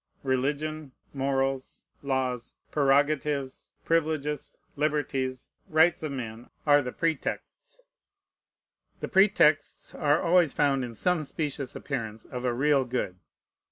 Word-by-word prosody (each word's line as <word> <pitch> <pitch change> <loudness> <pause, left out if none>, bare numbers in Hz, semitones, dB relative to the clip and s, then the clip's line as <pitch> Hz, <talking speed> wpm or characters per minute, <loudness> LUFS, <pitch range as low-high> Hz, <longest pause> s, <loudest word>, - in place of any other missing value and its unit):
Religion, 145 +2 -1 0.2
morals, 135 -1 -1 0.2
laws, 130 -3 -2 0.2
prerogatives, 140 -1 +1
privileges, 155 -3 0 0.2
liberties, 140 -4 -1 0.2
rights 160 +2 +4
of 155 -2 -3
men, 120 -3 -6 0.2
are 145 -1 +6
the 125 -2 -4
pretexts. 165 - -3 1.2
The - - -3
pretexts 190 -6 +3
are 150 0 +2
always 170 -3 +4
found 140 -3 +2
in 120 -2 -6
some 180 +4 +1
specious 145 -2 -4
appearance 115 -6 -5
of 125 0 -6
a 125 - +2
real 135 +3 +3
good. 120 -7 -3
140 Hz, 110 wpm, -28 LUFS, 130-155 Hz, 1.2 s, are